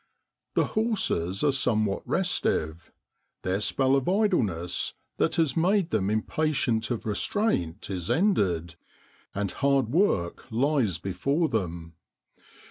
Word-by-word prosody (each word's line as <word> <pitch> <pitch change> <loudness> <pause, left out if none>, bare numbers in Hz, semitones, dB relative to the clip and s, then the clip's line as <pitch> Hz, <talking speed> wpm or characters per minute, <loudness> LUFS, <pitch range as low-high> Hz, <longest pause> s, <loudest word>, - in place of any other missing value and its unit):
The - - +3
horses 195 - 0
are 145 - +4
some 125 -5 +1
what 100 -1 -2
restive; 85 - 0 0.5
their 95 +2 -1
spell 135 +4 +2
of 135 +3 0
idleness, 130 - 0 0.2
that - - +1
has 160 -6 +1
made 180 +1 +2
them 100 -2 +1
impatient 115 0 0
of 120 -3 -3
restraint, 105 - -1
is 90 -3 -4
ended, 90 - +1 0.6
and 100 -1 -1
hard 140 -4 +1
work 125 - +1
lies 120 - +1
before 140 - -1
them. 85 -6 -3
115 Hz, 120 wpm, -27 LUFS, -, 0.6 s, are